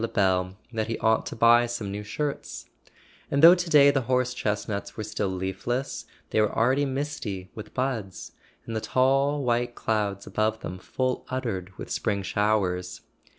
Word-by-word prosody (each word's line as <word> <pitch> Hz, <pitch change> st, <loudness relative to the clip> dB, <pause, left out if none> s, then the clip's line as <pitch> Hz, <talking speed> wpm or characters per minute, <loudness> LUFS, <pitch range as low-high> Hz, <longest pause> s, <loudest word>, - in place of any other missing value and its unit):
Lebel 95 Hz, -4 st, +1 dB, 0.2 s
that 110 Hz, -1 st, -1 dB
he 115 Hz, -, -2 dB
ought 110 Hz, 0 st, +2 dB
to -, -, -5 dB
buy 120 Hz, +1 st, +5 dB
some 115 Hz, -4 st, -4 dB
new 105 Hz, +1 st, -5 dB
shirts; 145 Hz, +7 st, -4 dB, 0.6 s
and 140 Hz, +2 st, +1 dB
though 170 Hz, +2 st, +11 dB
to 175 Hz, -1 st, -1 dB
day 145 Hz, -2 st, +7 dB
the 140 Hz, -1 st, +1 dB
horse 125 Hz, -1 st, +2 dB
chestnuts 105 Hz, -2 st, -3 dB
were 110 Hz, -, -3 dB
still 105 Hz, -1 st, -2 dB
leafless 95 Hz, +8 st, -3 dB, 0.3 s
they 110 Hz, -, +3 dB
were 105 Hz, -, +2 dB
already 130 Hz, +5 st, +3 dB
misty 130 Hz, -9 st, -4 dB
with 105 Hz, -1 st, -10 dB
buds, 110 Hz, -9 st, -3 dB, 0.3 s
and 115 Hz, -, -5 dB
the 110 Hz, -, -1 dB
tall 135 Hz, +4 st, +2 dB
white 120 Hz, 0 st, 0 dB
clouds 105 Hz, -3 st, -1 dB
above 110 Hz, +1 st, -1 dB
them 90 Hz, +1 st, -6 dB
full 130 Hz, +6 st, -2 dB
uddered 100 Hz, -8 st, -4 dB
with -, -, -8 dB
spring 100 Hz, -1 st, -1 dB
showers. 95 Hz, -3 st, 0 dB
110 Hz, 165 wpm, -26 LUFS, 100-130 Hz, 0.6 s, though